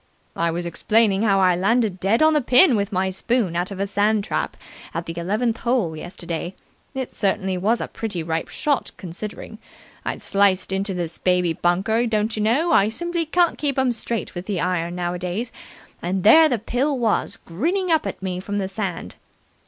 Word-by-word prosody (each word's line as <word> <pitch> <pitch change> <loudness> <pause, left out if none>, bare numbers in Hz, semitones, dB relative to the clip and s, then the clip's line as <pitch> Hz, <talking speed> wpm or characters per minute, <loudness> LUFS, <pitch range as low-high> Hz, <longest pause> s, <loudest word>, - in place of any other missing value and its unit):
"I 170 0 +1
was 170 +1 -3
explaining 210 +3 +2
how 200 -3 +3
I 185 -2 +4
landed 200 +1 +1
dead 210 +10 +2
on 315 0 +5
the 300 - +3
pin 255 +3 +6
with 200 0 -1
my 190 0 0
spoon 195 -1 -1
out 175 +2 -1
of 195 -2 -7
a 200 - +1
sand 205 +1 +1
trap - - -3 0.4
at 165 0 -3
the 165 - -5
eleventh 215 +7 -1
hole 235 -10 0
yesterday. 175 +2 -6 0.4
It 260 -2 -4
certainly 190 -2 0
was 210 +6 +1
a - - -3
pretty 200 -7 -4
ripe 160 0 -2
shot, 290 -2 -1
considering. 210 +4 -7 0.4
I'd - - -3
sliced 195 -2 +2
into 195 0 -1
this 170 -2 -5
baby 180 -2 +2
bunker, 195 +8 +1
don't 220 0 0
you 215 - -2
know; 265 +11 +2
I 200 +2 +4
simply 340 +7 -2
can't 345 +2 +2
keep 280 -3 0
'em 260 -1 +2
straight 230 -1 -4
with 175 +1 -7
the 200 -4 -1
iron 175 -1 -1
nowadays 180 +6 -3 0.5
and 185 +2 -2
there 315 +9 +7
the 245 - +1
pill 260 +6 -1
was, 225 -2 0
grinning 340 - -2
up 315 -10 +2
at 190 - -6
me 180 -1 -2
from 205 +2 -4
the 195 -2 -1
sand. 195 -2 -4
200 Hz, 190 wpm, -22 LUFS, 180-235 Hz, 0.5 s, there